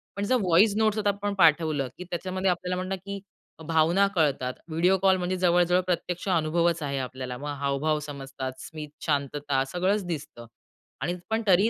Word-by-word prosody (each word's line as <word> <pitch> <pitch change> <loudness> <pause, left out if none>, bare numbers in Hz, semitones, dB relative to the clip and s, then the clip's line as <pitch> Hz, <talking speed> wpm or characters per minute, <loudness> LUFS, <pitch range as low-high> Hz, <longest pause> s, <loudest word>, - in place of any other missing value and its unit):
पण 200 - -2
जर 255 - +2
voice 190 +3 +5
notes 220 -1 +2
आता 205 -1 +2
आपण 200 0 -2
पाठवलं 155 -5 +3
की - - -6
त्याच्यामध्ये 185 +2 -1
आपल्याला 180 +1 -1
म्हणतात 185 +1 -3
की 200 0 -5 0.5
भावना 165 +4 +4
कळतात. 140 -6 +1 0.2
व्हिडिओ 175 +4 +3
कॉल 190 -1 +4
म्हणजे 180 +1 -1
जवळजवळ 180 0 +3
प्रत्यक्ष 180 +1 -2
अनुभवच 170 0 +2
आहे 140 -1 -2
आपल्याला. 130 -1 -5
मग 145 +2 -6
हावभाव 140 +2 0
समजतात. 135 -2 -5
स्मित, 155 -2 -8 0.2
शांतता 145 -2 0
सगळंच 190 +3 +1
दिसतं. 140 -7 -6 0.6
आणि 175 +6 -1
पण 220 +1 +1
तरीही 195 +4 +5
170 Hz, 165 wpm, -27 LUFS, 145-190 Hz, 0.6 s, voice